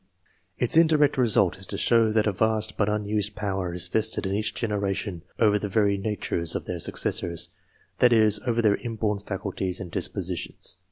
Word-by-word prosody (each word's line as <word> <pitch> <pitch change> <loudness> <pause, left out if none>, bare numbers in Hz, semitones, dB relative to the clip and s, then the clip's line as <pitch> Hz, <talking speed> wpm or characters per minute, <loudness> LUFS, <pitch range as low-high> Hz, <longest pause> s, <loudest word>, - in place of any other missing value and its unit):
[ts 125 - +1
indirect 155 -3 +4
result 105 -7 +3
is 95 - -4
to - - -3
show 115 -2 +3
that 110 -1 +2
a 105 - +2
vast 110 +1 +1
but 105 -1 +1
unused 105 -1 -1
power 95 -4 -2
vested 105 +5 -1
in 95 - -1
each 105 +2 -1
generation 100 -4 -2 0.2
ovef 105 -2 +3
the 105 - -3
very 100 -1 +2
natures 95 -5 -2
of - - -3
their 90 - -4
iccessors 85 +1 -1 0.5
that 125 - +5
is, 110 -2 +4
over 115 -1 +1
their 105 -2 +4
inborn 110 -3 -2
faculties 95 -2 -3
and 90 -3 -7
disposi 90 -1 -2
tions. 85 - -6
105 Hz, 175 wpm, -25 LUFS, 95-110 Hz, 0.5 s, that